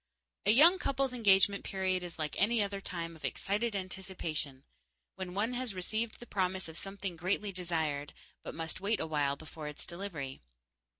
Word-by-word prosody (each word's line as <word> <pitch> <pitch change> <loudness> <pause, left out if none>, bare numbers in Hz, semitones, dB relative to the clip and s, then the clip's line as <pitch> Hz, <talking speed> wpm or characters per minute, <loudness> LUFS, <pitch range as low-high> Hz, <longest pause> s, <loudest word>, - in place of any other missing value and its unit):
A - - +8
young 330 - +8
couple's 270 -3 0
engagement 200 -4 +5
period 185 -1 0
is 175 -2 -7
like 155 -2 -2
any 230 +4 +4
other 200 -1 -3
time 170 -3 -4
of 160 - -16
excited 210 +3 0
anticipation, 180 -7 -3 0.5
when 185 -1 -6
one 220 +5 +1
has 245 -4 -1
received 220 +5 -1
the 240 - -9
promise 190 -4 0
of 160 - -9
something 195 0 -4
greatly 190 +4 0
desired, 160 -6 -1 0.3
but - - -7
must 165 +2 -3
wait 210 +3 +1
awhile 150 -3 +1
before 155 +1 -8
its 150 - +1
delivery. 170 -7 -5
190 Hz, 165 wpm, -33 LUFS, 160-205 Hz, 0.5 s, A